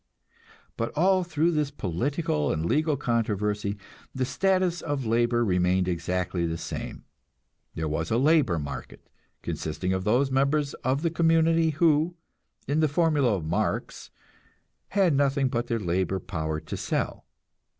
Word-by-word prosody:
But 115 - -2
all 185 +3 +4
through 165 0 +1
this 150 -3 0
political 120 - -1
and 80 0 -1
legal 155 - +1
controversy 105 -5 -1 0.4
the 130 0 0
status 185 +2 +1
of 145 -5 -3
labor 120 +1 +2
remained 90 -1 +2
exactly 90 0 -1
the 80 0 -3
same; - - -6 0.7
there 80 0 -2
was 80 +2 -2
a 115 - +2
"labor 140 - +3
market," 70 -4 -7 0.4
consisting 90 +4 -3
of 95 0 -1
those 125 +7 +2
members 140 +2 +1
of 135 +4 0
the 165 - +1
community 165 0 +3
who, 160 +2 +2 0.5
in 145 +3 +1
the 155 - +4
formula 145 -6 +2
of 85 -5 -4
Marx, 80 +3 -2 0.8
had 190 -5 +2
nothing 140 -1 +2
but 120 -1 -2
their 115 - 0
labor 95 0 -1
power 80 -4 -3
to - - -7
sell. - - -3
125 Hz, 140 wpm, -26 LUFS, 90-155 Hz, 0.8 s, all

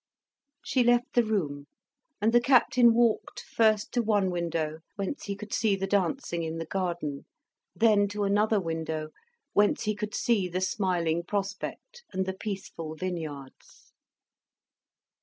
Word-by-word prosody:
She 255 - +2
left 240 0 +2
the 240 - +4
room; 150 -10 -2 0.5
and 220 +3 +2
the 240 - +6
Captain 245 -1 +5
walked, 235 -2 +1
first 215 -2 +2
to 245 - +1
one 205 -4 +1
window, 165 -3 -2 0.2
whence 200 +7 -4
he 200 - -3
could 210 +1 -8
see 220 -4 +2
the 195 0 -2
dancing 195 -1 0
in 160 0 -3
the 165 - -4
garden, 170 -5 -3 0.5
then 210 -3 +4
to 205 +1 -3
another 210 +2 +2
window, 160 -3 -3 0.4
whence 205 +2 +3
he 215 -1 0
could 210 -1 -5
see 215 -6 +1
the 180 +1 -2
smiling 180 -5 0
prospect 200 - -4
and 190 0 -1
the 190 - -2
peaceful 190 -6 -6
vineyards. 155 -6 -7
195 Hz, 140 wpm, -28 LUFS, 170-215 Hz, 0.5 s, the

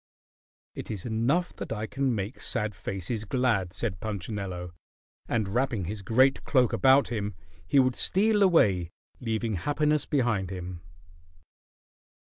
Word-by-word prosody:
"It - - -7
is 105 -5 -5
enough 120 +10 0
that - - -6
I 110 -1 -2
can 130 +1 -1
make 105 +4 -4
sad 105 -3 -1
faces 95 +5 -4
glad," 110 -6 0
said 95 -3 -3
Punchinello, 95 -4 -5 0.5
and 110 -4 0
wrapping 120 -3 0
his 105 +3 -5
great 130 +7 +3
cloak 125 -4 +2
about 130 +6 +5
him, 105 -4 -3 0.3
he 140 - +2
would 130 -2 +4
steal 210 +2 +2
away, 100 - +4 0.3
leaving 115 -1 -2
happiness 150 - +1
behind 120 - +1
him. 90 -2 -6
110 Hz, 130 wpm, -28 LUFS, 95-130 Hz, 0.5 s, about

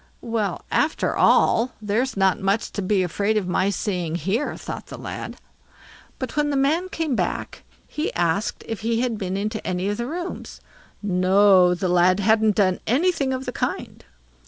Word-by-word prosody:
Well, 220 -5 -2
after 305 - +1
all, 240 +3 +3
there's 215 +4 -1
not 190 0 +3
much 195 +2 0
to 205 - -4
be 190 0 +1
afraid 205 +4 0
of 195 -4 -1
my 185 +2 +1
seeing 180 -4 -2
here, 195 - -1
thought - - -7
the - - -8
lad. - - -7 0.8
But - - -5
when 295 0 +1
the 285 - 0
man 315 +7 +1
came 320 -7 -2
back, - - -3 0.3
he 305 - -3
asked 175 +5 0
if 225 - -4
he 230 +1 0
had 240 -4 -1
been 190 0 -2
into 215 +2 -3
any 185 +2 -2
of 205 - -2
the 235 - -3
rooms. 350 +5 -6 0.4
No, 185 -1 +4
the 185 +2 -2
lad 180 +2 +3
hadn't 215 0 +3
done 185 -3 +2
anything 280 +2 +1
of 260 0 -3
the 250 - -3
kind. - - -4
210 Hz, 175 wpm, -23 LUFS, 185-250 Hz, 0.8 s, No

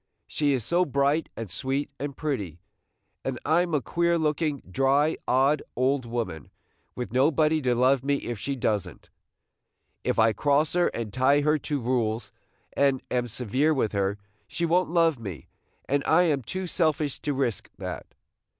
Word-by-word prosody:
She 145 -2 0
is 125 -4 -1
so 175 +9 +2
bright 140 +1 +1
and 115 - -4
sweet 135 +8 -2
and 140 0 -5
pretty, 105 - -3 0.6
and 130 -2 -3
I 160 +4 +4
'm 175 -3 -1
a 140 - 0
queer 170 0 +1
looking, 150 -2 -1
dry, 135 - +2
odd 135 +3 +3
old 130 0 +1
woman, 115 - -4 0.5
with 125 -2 -5
nobody 155 +4 +3
to 125 -3 +1
love 130 +2 +3
me 140 +1 +2
if 120 -5 -4
she 140 +5 -3
does 105 -6 0
n't. - - -18 0.9
If - - 0
I 110 0 +4
cross 145 +6 +2
her 175 0 +3
and 110 -3 -4
tie 135 +3 +3
her 150 +1 +2
to 145 0 -2
rules, 115 -3 -1 0.4
and 140 -2 +2
am 125 -1 0
severe 130 +7 0
with 115 -6 0
her, 100 0 0 0.3
she 170 - -2
won't 175 +1 +2
love 165 -5 +2
me, 95 -8 -8 0.4
and 140 +1 +1
I 170 +3 +5
am 150 -6 +1
too 185 +10 -4
selfish 155 -5 0
to 145 -1 -2
risk 130 -5 -2
that. - - -6
140 Hz, 170 wpm, -26 LUFS, 120-155 Hz, 0.9 s, I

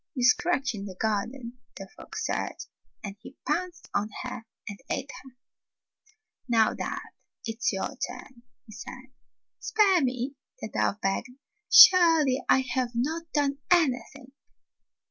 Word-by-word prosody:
"You 250 - -2
scratch 270 +2 +2
in 200 -2 -6
the 185 - -9
garden," 235 +5 -3 0.2
the 195 - -8
fox - - -6
said. - - -2 0.5
And 200 -1 -6
he 255 +4 -13
pounced 350 +3 -2
on 210 +1 0
her 250 -3 -7 0.2
and 205 -2 -7
ate 265 +1 -3
her. 260 -2 -16 1.1
"Now, 225 -2 +3
dove, - - -4 0.5
it's 225 +1 -1
your 195 +7 -4
turn," 255 -1 -7 0.2
he 220 - -15
said. 255 +4 -10 0.5
"Spare 400 -5 +3
me!" 255 +1 -2 0.3
the 220 - -6
dove 205 - -1
begged. 195 +5 -1 0.4
"Surely, 325 -7 +7
I 265 - +5
have 250 -1 -1
not 320 +7 -2
done 280 -2 0
anything." 275 -5 +1
255 Hz, 135 wpm, -27 LUFS, 225-285 Hz, 1.1 s, Surely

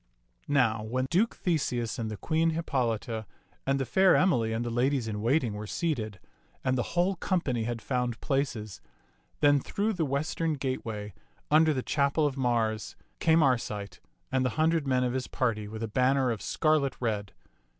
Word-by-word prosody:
Now 120 -6 +2
when 125 +4 -1
Duke 205 +7 +2
Theseus 130 - -1
and 110 -1 -2
the 110 - -5
Queen 165 +4 +1
Hippolita 115 - -1 0.4
and 135 0 +2
the 135 - 0
fair 190 +6 +4
Emily 120 -12 +3
and 115 +2 -1
the 120 - -2
ladies 125 0 +1
in 105 -1 -3
waiting 120 -1 +1
were 105 +1 -6
sealed 115 - -2 0.5
and 130 - +1
the 130 +7 -3
whole 180 +3 +3
company 140 - 0
had 115 -1 -4
found 125 -1 -1
places, 130 - -2 0.6
then 145 -1 +5
through 210 +10 -1
the 175 -4 -1
western 155 +3 -1
gateway, 115 -6 -4 0.4
under 155 +1 +6
the 130 -4 -1
chapel 140 +1 +1
of 140 -3 0
Mars, 115 -4 0 0.2
came 160 -1 +4
Arcite 110 -6 -1 0.3
and 130 - +2
the 130 - +2
hundred 160 -2 +2
men 130 -1 +2
of 125 -1 0
his 130 -1 -2
party 110 -4 -1
with 110 +1 -6
a - - -1
banner 130 +3 +2
of 110 - -4
scarlet 155 -4 +1
red. 105 -5 -2
130 Hz, 170 wpm, -29 LUFS, 115-150 Hz, 0.6 s, under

